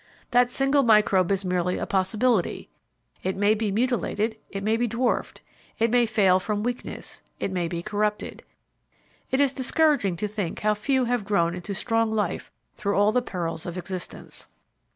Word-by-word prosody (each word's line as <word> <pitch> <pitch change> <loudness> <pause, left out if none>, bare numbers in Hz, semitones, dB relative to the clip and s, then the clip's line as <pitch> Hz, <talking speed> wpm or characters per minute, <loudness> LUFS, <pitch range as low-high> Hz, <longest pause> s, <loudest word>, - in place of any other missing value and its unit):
That 245 0 +4
single 275 +2 +2
microbe 210 -6 +4
is 195 0 0
merely 180 0 0
a - - -2
possibility. 200 +2 0 0.5
It 190 +1 -2
may 205 +2 +4
be 215 -1 -1
mutilated, 225 -1 0
it 195 0 -5
may 215 +2 +2
be 240 +1 0
dwarfed, 235 +3 -1 0.4
it 225 0 +2
may 240 -1 +4
fail 195 -4 +4
from 210 +2 -2
weakness, 245 +1 -5 0.2
it - - -2
may 180 -2 -1
be 170 0 -4
corrupted. 210 0 -2 0.9
It 265 - +1
is 280 -2 +3
discouraging 270 - +2
to 210 +5 -2
think 205 -5 -4
how 215 0 +3
few 255 +5 +1
have 240 -2 0
grown 195 -5 +1
into 180 +3 -5
strong 225 +1 +1
life 220 -1 -2 0.3
through 200 0 -1
all 205 +1 +4
the 250 +2 +2
perils 170 -7 -4
of 175 +1 -5
existence. 180 -1 -7
210 Hz, 170 wpm, -25 LUFS, 190-240 Hz, 0.9 s, That